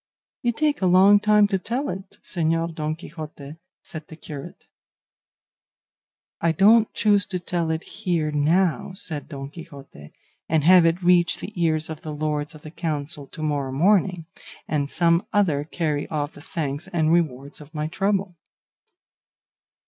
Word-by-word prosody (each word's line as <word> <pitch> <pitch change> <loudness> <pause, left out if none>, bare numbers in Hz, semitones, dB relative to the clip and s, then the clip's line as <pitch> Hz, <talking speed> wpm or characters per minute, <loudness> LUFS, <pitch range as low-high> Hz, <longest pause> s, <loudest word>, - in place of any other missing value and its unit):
"You 240 - +1
take 295 +3 0
a 185 - +3
long 190 +3 +6
time 210 0 +4
to 195 -2 0
tell 245 +9 -2
it, 190 +1 -7
Señor 165 -1 -1
Don 155 0 -2
Quixote," 155 -3 -9 0.3
said 155 -1 -8
the 160 - -11
curate. 150 -3 -9 1.8
"I 165 - +3
don't 215 +6 +5
choose 205 -2 +2
to 185 - -3
tell 175 -2 -2
it 160 +1 -2
here, 175 -7 -2
now," 160 +2 +1
said 155 -6 -4
Don 140 -2 -7
Quixote, 140 - -12 0.4
"and 155 -2 +2
have 175 +1 +7
it 170 +2 0
reach 175 -1 +4
the 215 - -8
ears 160 -3 +1
of 160 -1 -7
the 155 -1 -6
lords 150 +1 -2
of 150 - -14
the 155 - -9
council 150 -3 -3
to 155 - -8
morrow 145 -3 -1
morning, 180 +3 +2 0.4
and 145 -2 -1
some 170 +2 +2
other 165 -9 +2
carry 150 -3 -2
off 150 -1 -3
the 145 - -13
thanks 150 +1 -4
and 165 -4 +1
rewards 145 -4 -1
of 150 +2 -14
my 150 0 -1
trouble." 195 +2 -1
165 Hz, 155 wpm, -24 LUFS, 150-185 Hz, 1.8 s, have